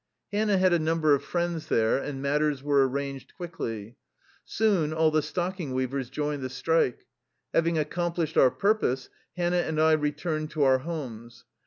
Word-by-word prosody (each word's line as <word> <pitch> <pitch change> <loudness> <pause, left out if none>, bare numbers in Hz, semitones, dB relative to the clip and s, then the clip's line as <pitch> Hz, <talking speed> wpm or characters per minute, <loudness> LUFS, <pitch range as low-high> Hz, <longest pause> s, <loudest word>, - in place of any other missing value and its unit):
Hannah 205 -1 +2
had 185 -1 +4
a 170 - +3
number 155 -1 +2
of 140 - +1
friends 170 -2 -2
there 110 +3 +2
and 140 -1 -5
matters 145 -1 0
were 140 -2 +3
arranged 140 0 -5
quickly. 115 - -6 0.5
Soon 195 -9 +1
all 160 0 +3
the 155 0 +2
stocking 175 -3 -3
weavers 130 0 -2
joined 145 +1 -2
the 130 - -3
strike. 145 0 0 0.5
Having 165 0 +2
ac 150 -1 0
complished 170 -2 -2
our 130 - +6
purpose, 195 - 0 0.3
Hannah 175 0 +1
and 160 -2 -2
I 160 0 +5
returned 155 +1 -1
to 155 -2 0
our 130 -1 +4
homes. 120 -7 -7
155 Hz, 165 wpm, -27 LUFS, 135-170 Hz, 0.5 s, our